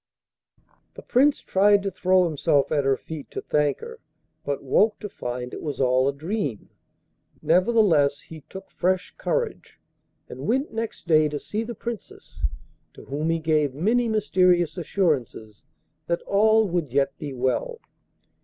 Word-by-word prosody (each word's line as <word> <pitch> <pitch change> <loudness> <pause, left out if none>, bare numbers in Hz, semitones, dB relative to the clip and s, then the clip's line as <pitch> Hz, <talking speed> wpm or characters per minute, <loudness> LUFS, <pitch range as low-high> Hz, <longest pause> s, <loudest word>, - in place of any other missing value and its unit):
The - - -10
Prince 280 +4 +3
tried 200 +1 +3
to 195 - -2
throw 185 0 +3
himself 145 -3 +1
at 145 -3 +1
her 135 -1 +2
feet 155 0 -9
to - - -5
thank 150 -1 0
her, 465 0 -9 0.4
but 140 -1 -3
woke 210 +10 +3
to 210 - -4
find 125 -5 -5
it - - -6
was 145 -4 -5
all 130 0 +3
a - - +2
dream; 150 - -4 0.7
nevertheless 170 -7 +3
he 160 -1 -12
took 190 - -10
fresh 185 0 -1
courage, 485 -2 -3 0.5
and - - -7
went 265 +4 0
next 225 0 -5
day 155 -3 +4
to 150 - -3
see 210 +8 -4
the 230 +1 -5
Princess, 230 -1 -8 0.5
to - - -13
whom 150 +4 -2
he 165 - +2
gave 155 -4 +1
many 230 - +1
mysterious 180 -6 +2
assurances 145 - -2 0.4
that 170 0 -1
all 220 +2 +3
would 170 -7 -2
yet 140 +1 +1
be 145 - -5
well. 130 - -1
170 Hz, 155 wpm, -24 LUFS, 140-210 Hz, 0.7 s, day